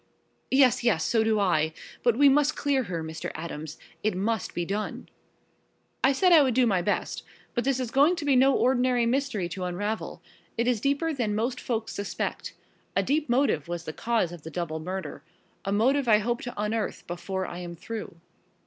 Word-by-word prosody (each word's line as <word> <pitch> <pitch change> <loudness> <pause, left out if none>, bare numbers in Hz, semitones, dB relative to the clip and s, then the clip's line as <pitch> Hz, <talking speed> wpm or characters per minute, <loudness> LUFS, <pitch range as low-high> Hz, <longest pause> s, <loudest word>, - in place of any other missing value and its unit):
"Yes, 265 -3 +4
yes, 210 -9 +2
so 225 -2 +2
do 220 -1 +2
I. 160 -5 +2 0.3
But 240 -2 +2
we 285 +1 +6
must 290 +2 +4
clear 275 -3 +1
her, 170 -4 -4
Mr. 160 0 -5
Adams 155 -1 -6 0.2
it 215 -3 0
must 220 +4 -2
be 175 - -1
done." 205 +4 -4 1.0
"I 265 - +6
said 360 +7 +3
I 320 - +9
would 260 -4 +2
do 255 -1 +5
my 195 -6 +2
best. 205 +4 -1 0.3
But 240 -2 -1
this 270 -1 +1
is 250 -3 -3
going 285 +7 +4
to 330 -4 -5
be 280 -2 +4
no 265 +2 +6
ordinary 250 -1 +2
mystery 250 -6 0
to 185 +2 -5
unravel. 205 +5 -3 0.3
It 235 +1 +1
is 240 -4 +1
deeper 285 +4 +1
than 225 -7 -1
most 240 +4 -1
folks 225 -3 -3
suspect. 200 0 -4 0.4
A - - +3
deep 295 0 0
motive 240 - +2
was 170 -1 -4
the 155 - -6
cause 225 -5 0
of 175 -2 -9
the 160 - -8
double 160 -2 -3
murder 185 +4 -5 0.4
a 195 - -1
motive 255 +6 +2
I 215 -2 +6
hope 235 +3 -1
to 245 -4 -7
unearth 210 +1 -2
before 190 +2 -4
I 175 - -6
am 175 -1 -7
through." 205 -1 -7
225 Hz, 195 wpm, -27 LUFS, 180-260 Hz, 1.0 s, I